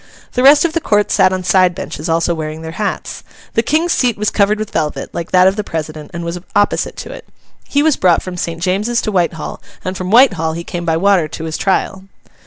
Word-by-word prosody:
The 250 - -1
rest 285 +4 +7
of 330 - -1
the 335 - 0
Court 210 -5 +1
sat 190 -2 +4
on 185 0 -2
side 185 -1 +3
benches, 150 +2 -6
also 165 +1 +1
wearing 155 0 -5
their 160 - -6
hats. 205 +4 -4 0.3
The 225 - +2
King's 315 +8 +1
seat 245 -7 +1
was 210 0 0
covered 205 +1 +2
with 215 -1 -5
velvet, 155 -2 -2
like 170 - -4
that 185 0 +5
of 190 +2 +1
the 210 - -1
president, 155 -3 -5
and 170 -1 -6
was 170 +1 -4 0.2
opposite 205 0 +1
to - - -7
it. - - -11 0.4
He 285 +1 +2
was 315 -3 +3
brought 180 -3 +3
from 185 -1 -6
St. 170 -1 -4
James's 210 +6 0
to 215 - -1
Whitehall, 170 -4 -2 0.2
and 185 +1 -3
from 185 0 -4
Whitehall 195 -9 +4
he 170 +1 -5
came 175 0 -5
by 160 -1 +1
water 190 -2 +3
to 155 - -7
his 160 0 -4
trial. 190 0 -1
185 Hz, 230 wpm, -16 LUFS, 165-210 Hz, 0.4 s, rest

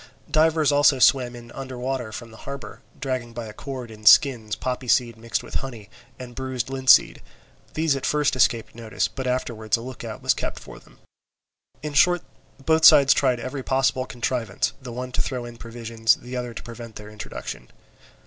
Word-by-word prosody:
Divers 155 -1 +3
also 145 -1 +5
swam 125 -1 +4
in 120 0 -12
under 130 -2 -7
water 125 -2 -3
from 120 0 -8
the 110 - -13
harbour, 140 -1 -8 0.2
dragging 130 -3 -3
by 120 -1 -5
a 105 - -9
cord 130 -1 -7
in 110 -1 -13
skins 110 -5 +5
poppyseed 125 -1 0
mixed 115 0 -3
with - - -11
honey, 115 -6 -9 0.3
and 125 -1 -9
bruised 130 -1 -4
linseed; 130 -1 +4 0.5
these 155 -2 +2
at 135 - -5
first 150 -3 +1
escaped 115 -3 +2
notice, 115 -1 -2
but 130 -1 -6
afterwards 120 -3 -1
a - - -8
look 130 +1 -8
out - - -7
was - - +4
kept - - -4
for - - -12
them. - - -22 0.9
In 150 -1 -4
short, 175 +4 +4 0.4
both 160 0 +3
sides 140 -1 +8
tried 130 -3 +1
every 130 +3 -5
possible 130 -1 0
contrivance, 120 -4 -2
the 125 -2 -8
one 125 +2 -5
to - - 0
throw 125 -2 -3
in 120 -1 -10
provisions, 115 0 0
and - - -18
the 125 +1 -6
other 125 -2 -4
to - - -7
prevent 115 -1 -10
their 105 0 -10
introduction. 105 - -8
125 Hz, 185 wpm, -24 LUFS, 115-135 Hz, 0.9 s, sides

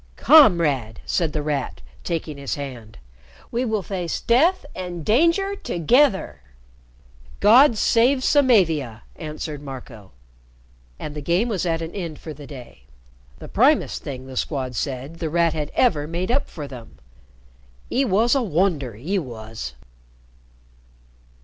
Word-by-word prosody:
"Comrade!" 160 - +4
said 165 -4 0
The 150 0 -3
Rat, 145 - -3 0.2
taking 160 -4 -4
his 140 - -3
hand. 125 -6 -8 0.5
"We 240 +2 -1
will 220 -4 -1
face 180 -3 -3
death 310 +10 +2
and 175 -4 -6
danger 335 - +2
together!" 190 - +1 1.0
"God 235 +4 +6
save 255 +5 +3
Samavia!" 165 - +2
answered 155 -2 -6
Marco. 125 -7 -10 0.9
And 150 - -6
the 150 - -6
game 175 - +1
was 185 -5 -1
at 165 0 -1
an 165 - -6
end 170 -6 -5
for 155 - -8
the 145 -1 -12
day. 130 -5 -12 0.5
The - - -10
primest - - +2
thing, 130 -2 -7
the 130 0 -10
Squad 130 -2 -2
said, 135 +6 -4
The 160 - -2
Rat 170 0 +2
had 150 -2 -3
ever 150 -13 +2
made 175 +5 -3
up 275 +3 0
for 150 -3 -7
them. 115 - -11 0.9
"'E 270 - +2
wos 230 +1 +2
a 275 - +2
wonder, 165 - 0
he 175 - -2
wos!" 110 - -7
165 Hz, 135 wpm, -22 LUFS, 140-215 Hz, 1.0 s, God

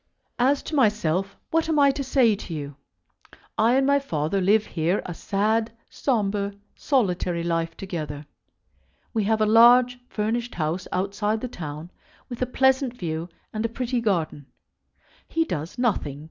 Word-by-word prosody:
As 270 +3 +3
to - - -7
myself, 200 - +1
what 325 0 +1
am 315 - +2
I 280 -1 +6
to 275 +1 -4
say 255 -4 +3
to 190 -4 -8
you? 145 -2 -6 0.8
I 230 +3 +3
and 270 0 +3
my 280 +1 +4
father 165 - -1
live 205 +3 +3
here 170 +3 0
a 175 - -4
sad, 220 +5 0 0.2
sombre, 205 -5 -1 0.2
solitary 180 - 0
life, 165 -1 -1
together. 155 -6 -5 0.9
We 220 -3 0
have 220 +1 +1
a - - +5
large 240 +3 +6
furnished 230 +3 -2
house 165 +2 -2
outside 205 +3 -1
the 255 - -4
town, 155 -4 -7 0.4
with 245 -1 -7
a 255 - +1
pleasant 265 0 +2
view 165 -2 -4 0.2
and 215 0 -2
a 230 - 0
pretty 245 +1 -2
garden. 165 -9 -1 0.8
He 325 0 0
does 165 - -5
nothing. 195 - 0
210 Hz, 155 wpm, -25 LUFS, 175-245 Hz, 0.9 s, I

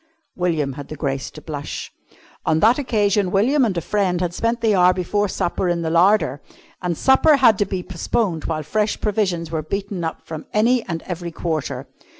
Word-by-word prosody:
William 160 -6 0
had 140 +1 -8
the 155 - -7
grace 135 -3 -3
to 155 - -13
blush. 145 -3 -6 0.5
On 160 0 +2
that 230 - +4
occasion 205 -7 +1
William 250 +10 +3
and 205 -7 0
a - - 0
friend 185 -2 0
had 175 -1 -1
spent 230 +4 -1
the 220 -2 +3
hour 180 -1 +5
before 205 +3 0
supper 180 0 -1
in 170 -1 0
the 160 - -1
larder, 170 -5 +3 0.4
and 175 -3 -2
supper 280 +3 +5
had 250 -6 +5
to 205 - +3
be 190 -2 -4
postponed 185 -1 -2
while 155 -1 -2
fresh 210 +8 -1
provisions 190 -6 -1
were 160 -1 -1
beaten 195 +2 -4
up 160 - -4
from 160 -1 -7
any 230 +3 +3
and 165 -2 -4
every 175 -1 -5
quarter. 155 -6 -3
180 Hz, 190 wpm, -21 LUFS, 160-210 Hz, 0.5 s, hour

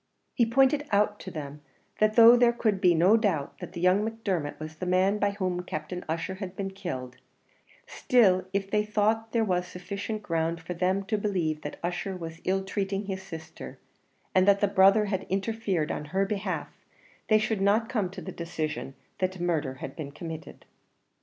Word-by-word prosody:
He 235 - +2
pointed 270 +5 +3
out 210 0 +2
to - - -7
them 150 -3 -7 0.4
that 215 0 +3
though 235 +1 +9
there 240 -1 +5
could 215 -5 0
be 180 -3 +5
no 180 +7 +5
doubt 185 -11 -1
that 185 - -8
young 180 +4 +3
Macdermot 200 -9 -3
was 155 0 -8
the 180 - -4
man 190 +3 +2
by 205 - +2
whom 185 -3 -2
Captain 180 +1 -5
Ussher 170 +4 -3
had 190 -1 -5
been 195 0 -4
killed, 130 -10 -6 0.7
still 195 -7 +3
if 195 0 -2
they 210 0 +2
thought 215 +1 0
there 230 -1 +2
was 180 -3 0
sufficient 200 +4 -5
ground 165 -2 -1
for 170 +2 -6
them 185 +3 0
to 215 +1 -1
believe 175 -7 -1
that 145 - -6
Ussher 180 +2 -3
was 165 -1 -8
ill 190 +1 +1
treating 195 +1 -2
his 190 -1 -4
sister, 165 -4 -9 0.6
and 185 +1 +4
that 200 0 +5
the 205 - +3
brother 195 +2 +5
had 195 -2 -3
interfered 195 -4 -1
on 150 - -4
her 190 +6 0
behalf, 195 -2 -3 0.6
they 215 - +5
should 215 -1 -1
not 210 +3 +3
come 215 -7 -1
to 190 0 -9
the - - -6
decision 155 -5 -4 0.2
that 185 0 -1
murder 160 -6 -1
had 135 +1 -8
been 145 -3 -6
committed. 160 +1 -8
190 Hz, 185 wpm, -28 LUFS, 170-210 Hz, 0.7 s, though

